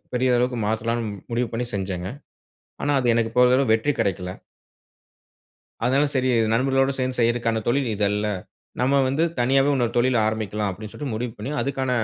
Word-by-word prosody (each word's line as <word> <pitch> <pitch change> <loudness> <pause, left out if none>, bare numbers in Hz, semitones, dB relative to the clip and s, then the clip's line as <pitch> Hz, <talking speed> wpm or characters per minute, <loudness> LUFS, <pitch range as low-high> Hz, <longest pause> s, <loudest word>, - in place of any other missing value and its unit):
பெரிய 125 0 +2
அளவுக்கு 125 0 0
மாத்தலாம்னு, 115 0 -1 0.2
முடிவு 120 -1 0
பண்ணி 120 +1 -2
செஞ்சேங்க. 95 -1 -3 0.7
ஆனா, 145 - +1
அது 125 - -2
எனக்கு 115 -1 0
போதியளவு 125 0 +4
வெற்றி 115 +6 +1
கெடைக்கல. 90 -1 -1 1.5
அதுனால 135 +4 +3
செரி, 130 0 +2 0.2
"நண்பர்களோட 135 +2 +2
சேர்ந்து 130 0 -1
செய்தறதுக்கான 115 -1 +1
தொழில் 130 +1 +1
இது 105 0 -2
அல்ல. 105 +1 -1 0.5
நம்ப 135 +2 +3
வந்து 140 +5 +1 0.2
தனியாவே 135 +3 +3
இன்னொரு 120 -3 0
தொழில் 125 +1 +3
ஆரம்பிக்கலாம்." 105 -1 -1
அப்டீன்னு 105 +3 -9
சொல்லி 145 -2 -5
முடிவு 115 +1 -3
பண்ணி, 115 +7 -4
அதுக்கான 135 -1 -2
120 Hz, 155 wpm, -23 LUFS, 110-130 Hz, 1.5 s, போதியளவு